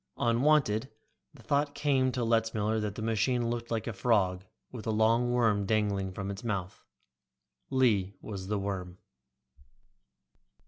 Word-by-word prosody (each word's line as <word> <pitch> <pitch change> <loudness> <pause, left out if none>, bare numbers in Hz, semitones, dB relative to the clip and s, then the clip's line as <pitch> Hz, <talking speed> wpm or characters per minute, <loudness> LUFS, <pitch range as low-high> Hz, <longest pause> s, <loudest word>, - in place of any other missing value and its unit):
Unwanted, 120 -1 +2 0.4
the 135 -5 -17
thought 145 +2 0
came 135 -3 +2
to 125 -1 -2
Letzmiller 110 -1 +1
that 105 -1 -3
the 110 - -5
machine 115 +2 +1
looked 120 0 -4
like 115 -2 -2
a 115 - -3
frog 95 -3 +1 0.3
with 120 -3 -8
a - - +1
long 115 +3 +3
worm 110 -5 +2
dangling 100 -3 0
from 95 +1 -4
its 100 +2 -8
mouth. 100 -5 -4 0.9
Lee 105 -8 +2
was 95 -3 -7
the 105 +1 0
worm. 95 -3 -4
110 Hz, 140 wpm, -30 LUFS, 100-120 Hz, 0.9 s, long